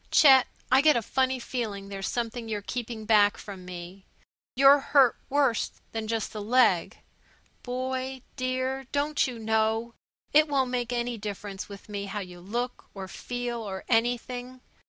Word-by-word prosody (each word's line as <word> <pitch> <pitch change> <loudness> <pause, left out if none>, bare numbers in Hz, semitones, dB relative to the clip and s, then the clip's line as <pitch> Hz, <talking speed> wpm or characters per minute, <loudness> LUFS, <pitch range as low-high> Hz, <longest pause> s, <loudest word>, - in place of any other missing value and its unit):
Chet, 265 -4 +7 0.2
I 260 +1 +7
got 305 -1 +5
a 235 - +1
funny 260 +3 +1
feeling 220 -6 -4
there's 195 -1 -4
something 235 -1 -3
you're 210 -2 -3
keeping 230 -1 -5
back 210 -2 +4
from 195 -3 -9
me. 180 +1 -9 0.5
You're 275 +2 +7
hurt 270 -3 +4
worse 275 -5 +2 0.2
than 225 -1 -4
just 225 -1 -2
the 215 - -5
leg. 220 -5 +3 0.6
Boy, 260 +1 -3
dear, 260 +1 -2
don't 290 +1 +1
you 250 -2 -6
know 220 +1 0 0.4
it 305 +1 +6
won't 270 -3 +1
make 245 -1 -1
any 240 -1 -2
difference 205 -1 -6
with 200 -1 -11
me 200 -1 -4
how 205 +1 -4
you 180 -2 -9
look, 240 +6 -4
or 190 -1 -6
feel, 245 +3 -4
or 190 -3 -6
anything? 245 +2 -1
235 Hz, 155 wpm, -27 LUFS, 210-255 Hz, 0.6 s, Chet